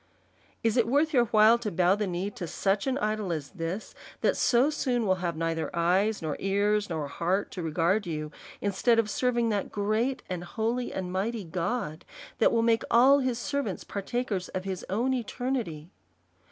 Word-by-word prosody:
Is 225 +1 +2
it 230 -2 +3
worth 295 +5 +2
your 245 -3 +5
while 220 +1 +5
to 230 -3 -3
bow 180 0 +3
the 205 0 -1
knee 180 +3 -2
to 175 - -6
such 195 +7 0
an 265 0 +1
idol 215 -5 -1
as 155 -4 -4
this, 180 +3 -5 0.3
that - - +2
so 255 +5 +3
soon 245 -6 0
will 185 -2 +2
have 170 -2 -1
neither 165 0 -1
eyes, 185 +4 +2
nor 155 -2 -2
ears, 205 +1 +1
nor 160 -3 -2
a - - -6
heart 180 +7 -1
to 180 - -5
regard 170 +5 +1
you; 155 -2 -4 0.3
instead 205 +4 +2
of 220 -2 +1
serving 240 0 +1
that 205 -2 -1
great, 215 +6 0
and 180 -2 -4
holy, 230 +6 -2
and 185 -1 -4
mighty 210 +4 -2
God, 170 -1 -3 0.4
that - - +5
will 230 -1 +2
make 230 -1 +3
all 265 +4 +6
his 255 -3 0
servants 260 -5 -3
partakers 205 -2 -3
of 185 - -4
his 190 -2 -4
own 235 +7 +1
eternity? 235 - -3
205 Hz, 185 wpm, -28 LUFS, 180-235 Hz, 0.4 s, all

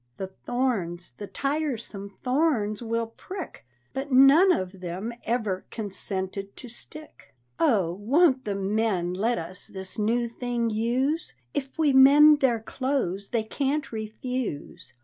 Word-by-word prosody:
The 190 0 -6
thorns, 190 - -1
the 200 +11 -8
tiresome 265 -9 -3
thorns, 250 -6 +1
will 230 0 -1
prick, 315 - -9 0.3
But 270 +1 -4
none 275 +9 +7
of 185 - -2
them 185 +6 -4
ever 215 -6 -1
consented 195 -2 -4
to 255 - -8
stick! 245 - -11 0.2
Oh, 195 - +3
won't 260 - +3
the 205 -2 -2
men 195 -3 0
let 220 +6 0
us 170 +2 -5
this 190 +1 -6
new 235 +3 +1
thing 235 -1 -2
use? 250 - 0 0.2
If 270 +1 -4
we 305 -4 +3
mend 290 +3 +8
their 245 -5 +2
clothes 225 -7 -2
they 230 -2 0
can't 280 +6 -2
refuse. 220 - -5
230 Hz, 130 wpm, -26 LUFS, 195-270 Hz, 0.3 s, mend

